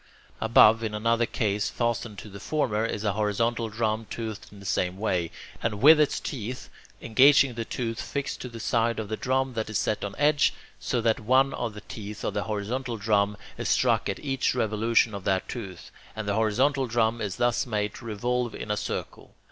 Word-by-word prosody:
Above, 110 0 +6
in 110 -2 -3
another 115 +2 +1
case 105 -1 0
fastened 120 -2 -2
to - - -8
the 100 -1 -10
former, 110 -3 0
is 105 - -4
a 105 - +1
horizontal 110 +3 0
drum 110 0 -1
toothed 110 -2 -5
in 100 - -13
the 100 - -12
same 90 0 0
way, 90 -5 0 0.3
and 115 -2 -1
with 150 +5 +8
its 150 -2 +2
teeth 125 -1 -5 0.3
engaging 135 +3 +5
the 115 0 -4
tooth 115 -1 -3
fixed 140 -1 -4
to 125 - -6
the 115 -1 -9
side 115 0 +1
of 110 -2 -4
the 110 - -1
drum 130 +2 0
that 110 -2 -3
is 110 - -1
set 105 - -1
on 100 -1 -4
edge, 145 0 +3 0.2
so 125 -4 -1
that 115 -1 +2
one 130 +5 +3
of 115 -3 -3
the 105 - -8
teeth 105 -1 -8
of - - -1
the 105 0 -2
horizontal 115 +4 -3
drum 105 -1 +1 0.2
is - - -2
struck - - +2
at - - -2
each 135 -2 -1
revolution 110 +1 +2
of 100 -2 -6
that 95 -1 0
tooth, 95 -8 -7 0.2
and 110 -1 -5
the 100 - +1
horizontal 130 +6 +2
drum 115 0 +1
is 100 -3 -2
thus 120 +1 +1
made 105 -2 -1
to - - -11
revolve 120 +2 -1
in 105 - -5
a 105 - 0
circle. - - -5
110 Hz, 205 wpm, -27 LUFS, 105-120 Hz, 0.3 s, with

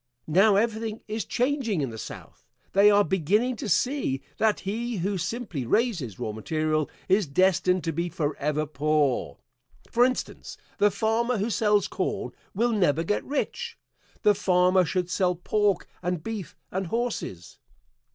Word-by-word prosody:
Now 195 +6 +4
everything 220 +1 0
is 220 +1 -3
changing 250 - 0
in 135 -4 -2
the 110 - -8
South. - - -9 0.3
They 200 +2 +7
are 205 0 +5
beginning 200 - +1
to - - -4
see 225 - 0
that 220 -1 +2
he 225 +4 -3
who 190 +2 -1
simply 185 - -3
raises 165 - 0
raw 110 - -3
material 155 +7 -1 0.2
is 190 -1 +3
destined 185 +3 +2
to 165 - -1
be 170 +3 -2
forever 150 -2 -1
poor. 150 -2 0 0.5
For 240 - +4
instance, 255 +1 -2 0.2
the 205 - +5
farmer 225 +4 0
who 210 +4 -1
sells 210 -2 +2
corn - - -3 0.2
will 235 +4 +2
never 165 -7 +2
get 205 +5 -1
rich; 465 - -3 0.5
the 210 - +6
farmer 180 -1 +3
should 180 +1 -1
sell 180 -1 +1
pork 200 +2 0
and 175 -2 -2
beef 210 -7 -6
and 190 0 -2
horses. 220 - -4
190 Hz, 150 wpm, -26 LUFS, 160-220 Hz, 0.5 s, They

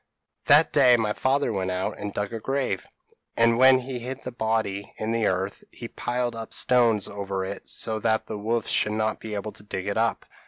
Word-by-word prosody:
p> - - -41
"That 155 +2 +3
day 130 -4 +6
my 110 -2 0
father 135 0 +1
went 95 -2 -1
out 90 +1 -2
and 105 0 -4
dug 105 +2 -3
a 115 - -3
grave; 135 -5 -2 0.5
and 115 0 +4
when 130 0 +7
he 130 0 -5
hid 130 +3 -6
the 125 - -5
body 110 -4 -2
in 110 +1 -2
the 115 -2 +1
earth, 95 +2 -2
he 120 - -8
piled 120 -1 -2
up 115 -1 -6
stones 115 -5 +3
over 100 -2 -4
it 100 +1 -7
so 110 -1 -1
that 110 0 +1
the 105 - -6
wolves 115 +2 -1
should 105 - +2
not 110 0 -1
be 110 -1 -6
able 105 +1 -4
to - - -15
dig 95 -2 -5
it 100 +1 -2
up. 115 +1 0
110 Hz, 220 wpm, -25 LUFS, 100-120 Hz, 0.5 s, when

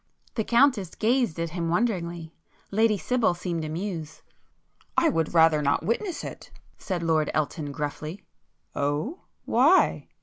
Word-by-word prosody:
The 220 - -1
Countess 235 - +3
gazed 230 -6 +1
at 165 -1 -2
him 170 -1 -2
wonderingly,—Lady 175 +2 -1
Sibyl 235 -3 +1
seemed 175 -2 -3
amused. 160 0 -5 0.7
"I 330 - +5
would 165 - -1
rather 160 -2 +5
not 145 +2 +1
witness 330 - -2
it,"—said 180 -4 -7
Lord 160 -2 +2
Elton 150 -1 -2
gruffly. 150 +5 -5 0.5
"Oh, 145 - -2 0.2
why?" 285 +11 +4
175 Hz, 115 wpm, -26 LUFS, 160-225 Hz, 0.7 s, I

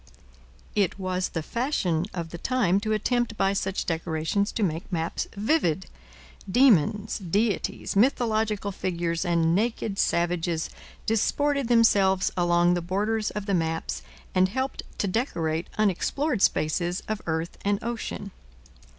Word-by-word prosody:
It 195 -3 +1
was 185 -1 -1
the 165 - -3
fashion 185 - 0
of 170 -2 -5
the 170 - -7
time 200 -7 +2
to 215 +1 -2
attempt 240 +1 0
by 195 0 +2
such 195 0 -1
decorations 165 +4 -1
to 220 - -1
make 165 0 -2
maps 165 -1 -2
vivid. 200 - +1 0.6
Demons, 215 - +3
deities, 200 +4 -1
mythological 220 -3 +2
figures 170 -3 -2
and 170 -2 +2
naked 215 0 -1
savages 170 -1 0 0.3
disported 280 +5 +1
themselves 200 -5 +4
along 175 0 +3
the 175 - 0
borders 210 +5 0
of 210 -1 -5
the 200 - -1
maps 165 -2 -1 0.3
and 185 0 +4
helped 260 +5 -2 0.2
to 205 - 0
decorate 170 - -1
unexplored 215 - +1
spaces 175 +3 +1
of 215 -1 -2
earth 160 +1 -2
and 200 0 +2
ocean. 230 -3 -4
195 Hz, 130 wpm, -26 LUFS, 175-220 Hz, 0.6 s, themselves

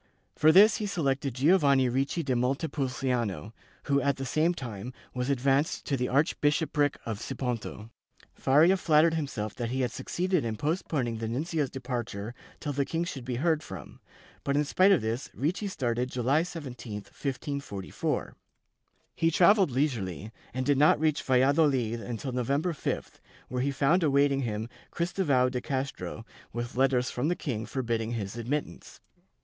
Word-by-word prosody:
For 155 +1 +5
this 205 +5 +7
he 210 - -2
selected 140 - -1
Giovanni 140 -2 +4
Ricci 135 +7 0
da 135 -3 0
Montepulciano 125 - -1 0.3
who, 140 -1 +2
at 140 -1 +1
the 135 - -5
same 160 +6 +1
time, 120 -2 -6 0.2
was 125 +1 -2
advanced 140 +2 +1
to 140 - 0
the 125 -1 -1
archbishopric 145 0 +1
of 110 -3 -3
Siponto. 115 -3 -4 0.4
Faria 160 +8 +4
flattered 160 -1 +4
himself 135 -10 -3
that 120 -2 -3
he 130 +2 -1
had 125 - 0
succeeded 180 -2 -1
in 115 -2 -2
postponing 140 - -1
the 110 - -3
nuncio's 145 +4 -1
departure 120 -4 -4 0.3
till 145 - -3
the 140 +1 +1
king 165 +4 -2
should 140 -7 -5
be 125 0 -3
heard 160 +4 +1
from, 95 - -10 0.4
but 140 - 0
in 150 - +2
spite 185 +7 +4
of 190 - +4
this 115 +4 -2
Ricci 180 - -1
started 125 -8 -1
July 130 +5 +2
17, 140 - -7
1544.' 130 - -4 0.8
He 165 - +2
travelled 185 +2 +5
leisurely 115 - -2 0.2
and 130 +1 -3
did 140 -1 +3
not 150 0 +5
reach 155 -1 +1
Valladohd 130 -3 +2
until 120 +3 -4
Novem 125 +4 0
ber 180 - 0
5th, 155 - -4 0.3
where 125 0 -2
he 140 - +1
found 140 +6 +2
awaiting 140 -2 +3
him 110 -2 -3 0.2
Christovao 150 -8 +1
de 125 -1 -2
Castro 135 -4 -4 0.3
with 120 0 -5
letters 130 -1 +2
from 125 +4 -1
the 175 - +1
king 115 -10 -4
forbidding 115 -3 -2
his 100 -2 -4
admittance. 125 +6 -4
135 Hz, 155 wpm, -28 LUFS, 120-150 Hz, 0.8 s, this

